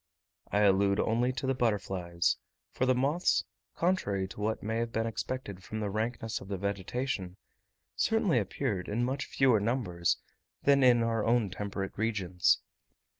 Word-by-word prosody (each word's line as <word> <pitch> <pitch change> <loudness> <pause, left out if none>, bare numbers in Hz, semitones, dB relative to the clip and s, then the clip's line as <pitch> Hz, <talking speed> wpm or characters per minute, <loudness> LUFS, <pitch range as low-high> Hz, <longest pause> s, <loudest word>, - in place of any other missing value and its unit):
I 105 - +3
allude 100 0 +4
only 120 +3 +2
to 135 - -4
the 135 - +2
butterflies; 95 -8 0 0.3
for 130 - 0
the 130 - +4
moths, 145 +8 +2 0.3
contrary 100 - 0
to 105 - -8
what 110 +1 -1
might 110 +2 -1
have 115 0 -1
been 115 0 0
expected 115 -4 -4
from 110 +3 -5
the 105 -2 -2
rankness 115 +1 -2
of 95 - -10
the 100 -1 -3
vegetation, 100 0 -3 0.6
certainly - - +2
appeared 95 -3 -2
in 115 +4 0
much 135 +2 -2
fewer 130 -5 +3
numbers 100 -6 0 0.5
than 140 -1 +5
in 120 -2 +6
our 115 -2 0
own 115 -4 +2
temperate 100 -1 -4
regions. 95 -5 +2
110 Hz, 155 wpm, -30 LUFS, 100-125 Hz, 0.6 s, in